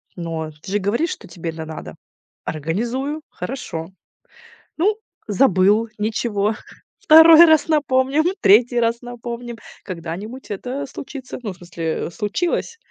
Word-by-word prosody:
но 165 -2 -4
ты 190 - -9
же 205 - +2
говоришь, 235 - 0
что 200 - -8
тебе 170 -1 -5
это 160 0 -7
надо. 160 0 -8 0.5
Организую. 235 - -2
Хорошо". 165 -11 -6 0.9
Ну, 410 +6 +2 0.3
забыл. 210 0 +3
Ничего. 215 -1 -1 0.4
2 320 +1 +9
раз 315 0 +4
напомним, 285 -1 +2 0.2
3 240 +4 +5
раз 230 0 0
напомним. 240 -1 -7 0.3
Когда-нибудь 190 +8 -7
это 255 +7 -4
случится. 270 -1 -8
Ну, 205 -5 -4
в - - -19
смысле, 170 -2 -4
случилось. 335 - -2
230 Hz, 120 wpm, -21 LUFS, 185-270 Hz, 0.9 s, 2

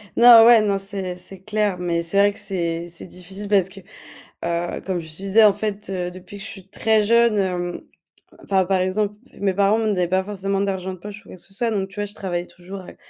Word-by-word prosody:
Non, 235 -1 +9
ouais, 230 -2 +8
non, 200 -2 +1
c'est 195 -2 -4
c'est 190 +1 -10
clair, 210 -1 -1
mais 170 -1 -1
c'est 170 +4 -2
vrai 205 0 +5
que - - -11
c'est 170 -4 -3
c'est 170 0 -8
difficile 190 +3 -5
parce 195 -3 +3
que, 195 +1 -12 0.7
heu, 170 0 -2
comme 185 -2 -2
je 160 - -10
te 155 - -8
disais, 195 +4 +4
en 210 - +7
fait, 205 0 -4
heu, 180 -2 -3
depuis 185 +3 -11
que 195 - -9
je - - -6
suis 195 -1 -11
très 220 +1 +2
jeune, 230 0 +3
hem, 180 -2 -2 0.6
enfin, 190 -1 +2
par 190 0 +1
exemple, 200 +3 0 0.3
mes 195 -2 +1
parents 200 +3 +3
me 225 - 0
donnaient 180 -4 +1
pas 190 +1 +1
forcément 195 -1 -2
d'argent 190 -2 -2
de 185 - -10
poche 205 +3 -9
ou - - -19
quoi - - -10
que - - -16
ce 195 - -16
soit, 230 +3 -1
donc 195 -3 -2
tu 195 - -16
vois, 205 0 -2
je 205 - -11
travaillais 175 -3 -3
toujours 185 +2 -10
à 180 - -13
c - - -12
195 Hz, 250 wpm, -22 LUFS, 180-205 Hz, 0.7 s, Non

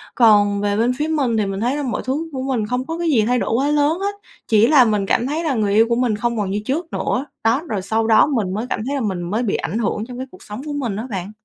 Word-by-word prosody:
Còn 205 -3 +4
về 205 0 0
bên 240 +3 +2
phía 300 +2 -1
mình 275 -8 0
thì 210 - +1
mình 195 0 -3
thấy 245 +5 0
là 290 - -2
mọi 245 - -2
thứ 300 +6 -2
của 265 - -4
mình 245 -6 -1
không 250 +2 -2
có 325 +3 -4
cái 340 0 -2
gì 230 -7 +3
thay 250 +2 +2
đổi - - -2
quá 275 +4 +1
lớn 300 +4 +2
hết, 405 +1 -2 0.3
chỉ 220 +1 +4
là 270 -4 +6
mình 210 -3 +1
cảm 240 +5 +1
thấy 315 +4 -2
là 300 -4 0
người 210 -3 0
yêu 220 +2 +5
của 235 - +2
mình 240 -3 +1
không 235 +1 -2
còn 195 -2 -1
như 205 +1 -1
trước 320 +5 -3
nữa. 260 - -1 0.2
Đó, 230 +6 +2
rồi 205 -4 -2
sau 220 +3 0
đó 220 -1 +6
mình 215 -10 -1
mới 220 +4 -2
cảm - - -2
thấy 285 - -1
là 270 - -1
mình 190 -5 -2
mới 210 +8 -2
bị 205 - 0
ảnh 205 - -3
hưởng 215 -1 -1
trong 250 -1 -8
cái 260 +1 -5
cuộc 185 - -15
sống 210 +5 -7
của 295 - -4
mình 245 -8 -2
á 225 +4 -5
bạn. 190 0 -4
235 Hz, 310 wpm, -20 LUFS, 210-275 Hz, 0.3 s, là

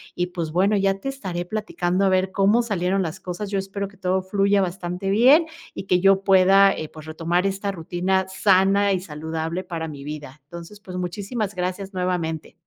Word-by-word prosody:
Y, 180 0 -1
pues, 170 -3 -4
bueno, 190 +5 +2
ya 195 -1 +2
te 235 - -7
estaré 185 -11 -4
platicando 185 -2 -1
a 195 - +4
ver 190 0 +1
cómo 205 +4 +3
salieron 195 -4 0
las 175 +2 -5
cosas, 185 +3 -5
yo 200 - 0
espero 195 +1 -3
que 200 - -18
todo 185 0 0
fluya 200 +1 +2
bastante 180 +1 -3
bien, 255 - +6 0.3
y - - -6
que 180 -2 +1
yo 195 0 +4
pueda, 195 +1 +6
eh, 155 - -6
pues, 155 -1 -12
retomar 165 +3 -1
esta 195 +1 -2
rutina 185 +2 -1
sana 195 +1 +3
y 185 - 0
saludable 160 +1 -4
para 165 -3 -5
mi 145 -2 -8
vida. 145 -2 -8
Entonces, 170 +6 -10
pues, 185 -3 -8
muchísimas 200 +4 -3
gracias 185 +2 -3
nuevamente. 180 -4 -2
185 Hz, 190 wpm, -23 LUFS, 175-195 Hz, 0.3 s, bien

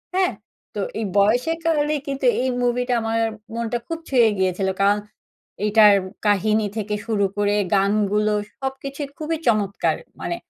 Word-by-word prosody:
হ্যাঁ? 375 -1 +2 0.4
তো - - -2 0.2
এই 225 - -1
বয়সের 245 +11 +3
কারণেই 300 -2 +1
কিন্তু 275 -1 -3 0.2
এই 260 - 0
মুভিটা 245 +1 0
আমার 225 0 -1 0.4
মনটা 235 +1 -1
খুব 330 0 -4
ছুঁয়ে 240 -4 +5
গিয়েছিল। 190 0 0
কারণ 205 +1 +4 0.7
এইটার 210 -1 +6 0.3
কাহিনী 210 +1 +2
থেকে 210 -1 -2
শুরু 210 -3 +1
করে, 205 0 +1 0.2
গানগুলো 210 +1 +2 0.3
সবকিছু 270 +1 -5 0.2
খুবই 320 +1 -2
চমৎকার! 210 -4 +1 0.2
মানে 345 - -3
225 Hz, 135 wpm, -22 LUFS, 205-270 Hz, 0.7 s, এইটার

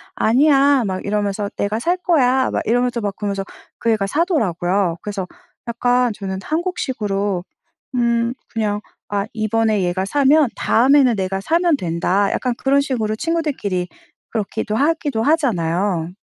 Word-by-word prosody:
"아니야." 275 +2 +4
막 185 0 -3
이러면서 205 0 -1
"내가 210 +2 -1
살 350 +8 0
거야." 265 -8 +2
막 - - -1
이러면서 245 +1 +1
그러면서 200 -1 -3 0.4
그 230 - +1
애가 200 -3 0
사더라고요. 195 - 0
그래서 200 -3 -4 0.4
약간 245 +1 +1
저는 190 -2 -5
한국식으로 210 - -2 0.5
'음. 235 -1 +1 0.2
그냥 210 -2 -2 0.3
아 200 -1 -1
이번에 215 -2 +1
얘가 180 +2 -1
사면 285 +2 +3
다음에는 260 0 +4
내가 190 -1 -2
사면 335 - +2
된다.' 185 +2 0
약간 250 -1 -1
그런 275 +2 +2
식으로 225 -6 -1
친구들끼리 275 - -2 0.4
그렇게도 210 0 -2
하기도 290 -4 0
하잖아요. 180 - 0
225 Hz, 315 characters per minute, -20 LUFS, 200-275 Hz, 0.5 s, 아니야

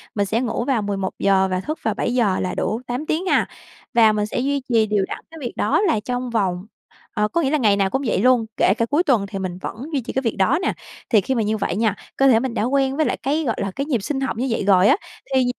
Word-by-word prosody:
mình 205 -1 +1
sẽ 220 +4 0
ngủ 240 -1 -2
vào 255 -5 +1
11:00 195 -1 +1
và 185 - 0
thức 305 - -5
vào 220 - +1
7:00 230 -3 0
là 185 - -2
đủ 225 +3 -2
8 250 +5 -3
tiếng 320 +4 -1
ha. - - +2 0.5
Và 225 -2 +6
mình 210 -1 0
sẽ 215 - -3
duy 280 +2 0
trì 225 -3 +3
đều 205 -2 +1
đặn - - -5
cái 325 - -11
việc 245 - -4
đó - - +1
là 330 - +2
trong 245 +3 -3
vòng 190 -5 -1 0.5
ờ, 210 -2 +1
có 340 +10 0
nghĩa 270 - +1
là 305 - +2
ngày 215 -7 +3
nào 195 -1 +1
cũng 265 - -1
vậy 215 - +1
luôn, 250 -1 +4
kể 190 - +4
cả 230 - +1
cuối 295 +7 +1
tuần 245 - +2
thì 195 -1 -5
mình 185 -2 -4
vẫn - - -5 0.2
duy 275 - +1
trì 235 - -7
cái 265 - 0
việc 230 -4 -1
đó 190 - +3
nè. - - 0 0.4
Thì 215 -4 +4
khi 260 +7 -2
mà 230 - +1
như 215 +1 0
vậy 200 - -2
nha, 215 -1 +1 0.2
cơ 270 - +4
thể 235 -4 +5
mình 255 0 -3
đã 220 - -1
quen 270 +2 +1
với 310 - +2
lại - - -1
cái, 295 +4 0
gọi 230 -6 -1
là, 195 - -2
cái 275 +8 -3
nhịp 255 -8 0
sinh 270 +5 -2
học 265 -4 -2
như 255 - -1
vậy 225 - -1
rồi 190 0 +5
á, - - +6 0.4
thì 260 -1 +3
230 Hz, 285 wpm, -21 LUFS, 205-265 Hz, 0.5 s, Và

